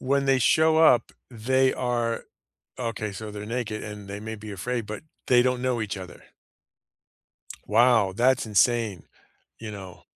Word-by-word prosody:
w 130 +1 -2
when 140 - -1
they 135 -1 +4
show 160 +5 +4
up, 155 -7 +4 0.2
they 130 +3 +1
are 120 -2 -2 0.6
Okay, 110 -3 -3
so 105 +2 -7
they're 105 0 -7
naked, 115 -1 -4
and 105 -1 -8
they 100 +1 -6
may 110 +1 -6
be 105 0 -9
afraid, 115 +4 -3
but 105 0 -6 0.2
they 125 -1 +5
don't 125 0 0
know 125 -3 0
each 105 -2 -4
other. 95 -1 -10 1.5
Wow, 115 -3 +4
that's 130 +3 +2
insane. 110 -3 +1 0.6
You 110 -1 -7
know 95 -3 -10
115 Hz, 160 wpm, -25 LUFS, 105-125 Hz, 1.5 s, they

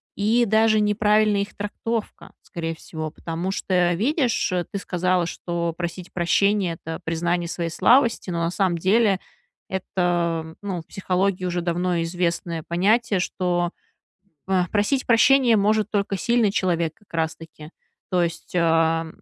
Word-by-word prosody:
и 225 +4 +2
даже 220 0 +3
неправильная 210 0 +3
их 200 - -6
трактовка, 215 +2 -5
скорее 165 -2 -5
всего, 155 -1 -6
потому 165 +3 -5
что, 180 -2 +1
видишь, 245 - 0 0.2
ты 200 - -3
сказала, 180 -2 0
что 170 0 -3
просить 175 +1 -6
прощения- 185 +1 +2
это 160 0 -5
признание 170 +1 -1
своей 170 -1 -3
слабости, 235 - +3
но 170 -1 -2
на 165 - 0
самом 185 -2 0
деле 195 +2 +3 0.5
это, 175 -3 -1
ну, 190 -4 -4
в - - -19
психологии 185 0 -1
уже 175 -1 -1
давно 175 +1 0
известное 170 -1 -2
понятие, 200 +4 +2
что, 175 -1 -1 0.8
а, 185 -2 +1
просить 215 +6 0
прощения 245 0 +5
может 210 +1 +1
только 200 -1 -1
сильный 235 +2 +2
человек, 170 -5 0
как 210 - -28
раз 160 -1 -1
таки, 155 -2 -12 0.4
то 180 -2 +2
есть, 170 +1 -4
а, 165 -1 +2
180 Hz, 140 wpm, -23 LUFS, 170-210 Hz, 0.8 s, прощения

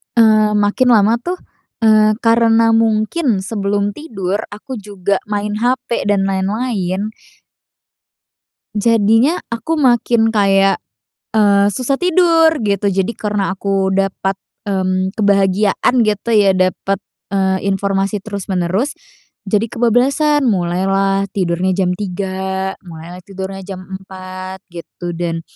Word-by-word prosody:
eee, 215 -2 +5
makin 210 +5 +2
lama 220 +3 +3
tuh, 355 +9 -3 0.5
eee, 215 -1 +5
karena 230 0 +4
mungkin 225 - +1
sebelum 205 -1 -1
tidur 200 - -4
aku 230 +4 -8
juga 200 -1 -2
main 210 0 -2
HP 245 -3 -1
dan 200 -1 +2
lain-lain 195 0 -2 1.6
jadinya 225 - +3
aku 235 +8 -2
makin 240 -3 +3
kayak, 195 -2 +3 0.5
eee, 200 -2 +4
susah 260 +6 -1
tidur 335 -2 +4
gitu. 200 -1 0
Jadi 195 +2 0
karena 205 -2 -1
aku 195 0 -1
dapat, 195 0 -1 0.2
mmm, 185 -1 -1
kebahagiaan 200 +3 +2
gitu 215 +2 -1
ya 200 -3 +4
dapat, 185 +1 0 0.3
eee, 190 0 0
informasi 195 +1 -1
terus-menerus 200 +4 -2 0.5
jadi 210 +2 +2
kebablasan. 270 +5 +2
Mulailah 195 +1 +1
tidurnya 185 0 0
jam 185 -1 +1
03:00, 190 -1 -3
mulailah 170 +1 -10
tidurnya 195 -1 -7
jam 190 -2 -7
04:00 185 0 -9
gitu 175 +1 -7
dan 165 -1 -3
200 Hz, 110 wpm, -17 LUFS, 190-225 Hz, 1.6 s, eee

